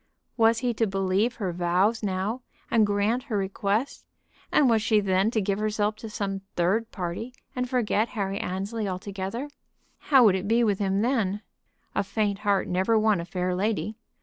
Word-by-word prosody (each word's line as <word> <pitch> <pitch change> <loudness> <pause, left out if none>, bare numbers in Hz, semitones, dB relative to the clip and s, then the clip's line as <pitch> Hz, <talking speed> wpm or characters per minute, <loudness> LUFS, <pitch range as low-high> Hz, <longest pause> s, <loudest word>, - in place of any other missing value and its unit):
Was 225 -1 +4
he 240 - +2
to 225 0 +1
believe 195 +4 0
her 190 -5 -3
vows 180 +6 +1
now 205 +4 -2 0.3
and 225 -4 +4
grant 205 +4 +1
her 215 - -2
request, 200 +5 -1 0.5
and 290 - +4
was 225 -2 +3
she 215 -1 +3
then 195 +1 +2
to 225 - 0
give 195 +1 -1
herself 215 0 0
to 225 - -8
some 195 -2 -3
third 200 +7 +1
person 185 +7 -5 0.2
and 250 -1 -2
forget 235 -3 +1
Harry 195 -1 -1
Annesley 200 +4 -3
altogether? 195 +7 -4 0.6
How 270 -4 +7
would 210 -4 +6
it 190 +1 -2
be 230 +2 +3
with 205 -4 +1
him 195 0 +1
then? 215 -5 0 0.5
A 200 - +1
faint 200 0 -1
heart 200 -2 +1
never 190 +5 +2
won 215 -4 +3
a - - -6
fair 180 +1 -2
lady. 205 +1 -1
205 Hz, 175 wpm, -26 LUFS, 190-225 Hz, 0.6 s, How